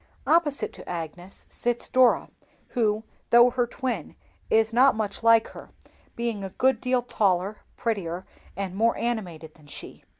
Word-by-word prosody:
Opposite 295 -1 +1
to - - -11
Agnes 175 +2 -7
sits 240 0 -2
Dora, 255 -1 +3 0.4
who, 220 -3 0 0.3
though 240 +1 +7
her 245 -1 0
twin, 235 - -4 0.3
is 220 0 +3
not 260 +1 +5
much 210 -2 -3
like 230 -1 +5
her, - - -12 0.5
being 230 -4 -3
a 195 - -4
good 260 +7 +1
deal 250 -1 +1
taller, 200 -3 0 0.2
prettier, 190 -6 -3 0.3
and 195 -2 -3
more 230 +3 +2
animated 180 -10 -4
than 150 -2 -20
she. - - -10
225 Hz, 145 wpm, -26 LUFS, 190-240 Hz, 0.5 s, though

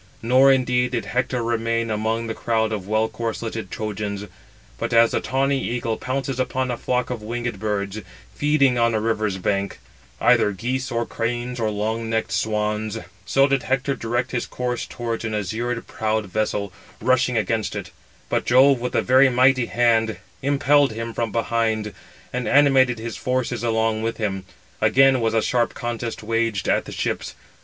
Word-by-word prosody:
Nor, 130 +3 +6
indeed, 125 -1 +1
did 120 - -1
Hector 125 -1 -1
remain 115 0 0
among 110 +2 -1
the 115 - -3
crowd 110 -1 0
of 100 -3 -4
well 110 +1 +2
corsleted 115 -2 -4
Trojans; 105 -1 -4 0.5
but - - -2
as 115 0 +6
the - - 0
tawny 135 +1 0
eagle 115 -2 -1
pounces 135 +1 -3
upon 130 0 -1
a 120 - -3
flock 125 0 -1
of 120 -3 -4
winged 120 -1 -4
birds, 105 -1 -2 0.3
feeding 140 -4 +2
on 115 -1 +3
a - - +2
river's 110 -3 -1
bank, 100 +1 -1 0.4
either 105 - +4
geese 125 +6 -2
or 115 0 -1
cranes, 120 +2 -3
or 110 -2 +1
long 110 +2 -2
necked 110 -2 -1
swans, 105 +2 -1 0.3
so 135 0 +4
did 140 -2 +1
Hector 135 +2 0
direct 120 +2 -2
his 120 - -2
course 125 -1 -3
towards 115 -1 -4
an 110 -1 -2
azure 115 +4 -2
prowed 110 0 -2
vessel, 100 -1 -2 0.3
rushing 130 -1 +2
against 110 +1 -1
it; - - -6 0.4
but - - 0
Jove, 130 +2 +5
with 125 +1 -3
a - - +2
very 130 +2 +5
mighty 130 0 +3
hand, 115 -3 +2 0.2
impelled 140 -1 +3
him 115 +1 -5
from 115 -2 -2
behind, 110 -1 0 0.4
and 125 -1 -2
animated 135 -4 +4
his 115 0 -6
forces 130 -2 -1
along 110 -1 +1
with 115 +1 -2
him. 95 -3 -2 0.4
Again 135 -1 +5
was 115 0 +1
a 110 - +3
sharp 120 -2 +1
contest 120 -1 -4
waged 115 -3 0
at - - +2
the - - -8
ships. - - -3
115 Hz, 170 wpm, -22 LUFS, 110-125 Hz, 0.5 s, Nor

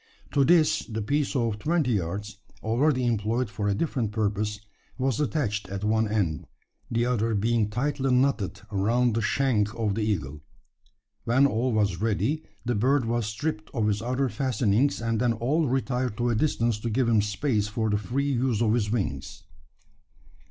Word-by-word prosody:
To 140 - +3
this 160 +1 +4
the 110 -2 -4
piece 145 +5 0
of 115 -5 0
twenty 155 -1 +1
yards 100 +2 -3 0.3
already 130 +4 +2
employed 115 +1 0
for 105 0 -2
a 100 - +1
different 120 -4 -1
purpose 105 -1 -1 0.4
was 130 -2 0
attached 125 -10 -1
at 100 +1 -5
one 110 +1 +2
end 90 -9 -1 0.4
the 115 +1 +1
other 115 -2 0
being 110 +1 +1
tightly 135 +4 -1
knotted 125 -7 +1
around 115 +5 +2
the 115 - 0
shank 110 -2 +1
of 110 -3 0
the 110 - -2
eagle. 80 -9 -2 0.8
When 130 +4 +4
all 125 -1 +1
was 105 -5 0
ready, 115 - 0 0.2
the 120 - 0
bird 130 +4 +2
was 115 -1 -1
stripped 110 0 -3
of 110 - +1
his 105 -1 0
other 130 +3 0
fastenings; 125 -1 +1
and 115 -1 0
then 120 -2 +2
all 140 +8 0
retired 125 -3 -1
to 120 0 +1
a - - +1
distance 115 -4 +1
to 115 - -3
give 120 +2 +1
him 110 -3 +4
space 105 +1 0
for 110 +1 -1
the 105 - +2
free 135 +8 -1
use 125 -3 +1
of 110 -2 +2
his 110 -4 +1
wings. 95 - -3
115 Hz, 175 wpm, -26 LUFS, 105-130 Hz, 0.8 s, this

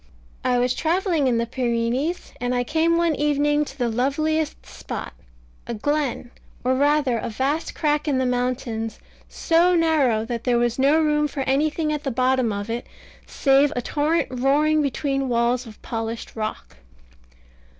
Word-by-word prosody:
I 250 -1 +2
was 245 0 +2
travelling 330 -1 +1
in 240 -2 +2
the 230 - 0
Pyrenees; 245 +6 -2
and 245 0 0
I 245 - +1
came 325 +5 +1
one 340 -1 +2
evening 295 0 +1
to 275 - -11
the 245 -3 0
loveliest 295 +6 -1
spot - - -7 0.5
a 235 - -3
glen, 280 0 -2 0.3
or 255 +1 +2
rather 280 -3 +2
a - - -4
vast 275 +8 -2
crack 300 -1 0
in 280 -3 +1
the 260 - +1
mountains, 245 -3 -2 0.3
so 345 +2 +3
narrow 290 -10 +2
that 235 -1 -4
there 245 -2 +2
was 240 +1 0
no 285 +4 +4
room 300 -1 +2
for 285 -1 -5
anything 305 +3 0
at 300 - -3
the 275 - -1
bottom 255 -1 +1
of 205 0 -4
it, 235 +2 -4 0.4
save 275 +1 +3
a 245 - -1
torrent 310 +5 0
roaring 290 +5 +2
between 275 -1 -1
walls 240 +1 +1
of 215 - -13
polished 225 -1 -5
rock. 215 - -5
270 Hz, 160 wpm, -23 LUFS, 240-300 Hz, 0.5 s, no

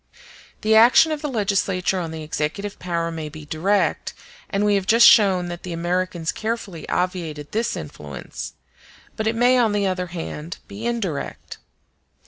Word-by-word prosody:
The 220 0 +2
action 240 +8 +7
of 305 -1 -2
the 300 - -2
legislature 195 -5 0
on 170 -2 -3
the 160 -1 -6
executive 160 +7 -3
power 170 -1 -2
may 160 -2 -5
be 155 0 -10
direct; 185 +7 0 0.3
and 200 +1 0
we 205 - +3
have 195 -2 0
just 230 +2 +7
shown 190 -5 +6
that 175 0 -6
the 180 - -6
Americans 175 0 -1
carefully 215 -7 -4
obviated 170 -5 -2
this 230 +2 -1
influence; 75 -2 -8 0.6
but 220 - -2
it 225 - +1
may, 250 +2 +4
on 225 -3 +3
the 205 -1 +1
other 185 -1 -1
hand, 165 -1 -6
be 215 +4 -5
indirect. 200 -11 -4
185 Hz, 160 wpm, -22 LUFS, 165-215 Hz, 0.6 s, action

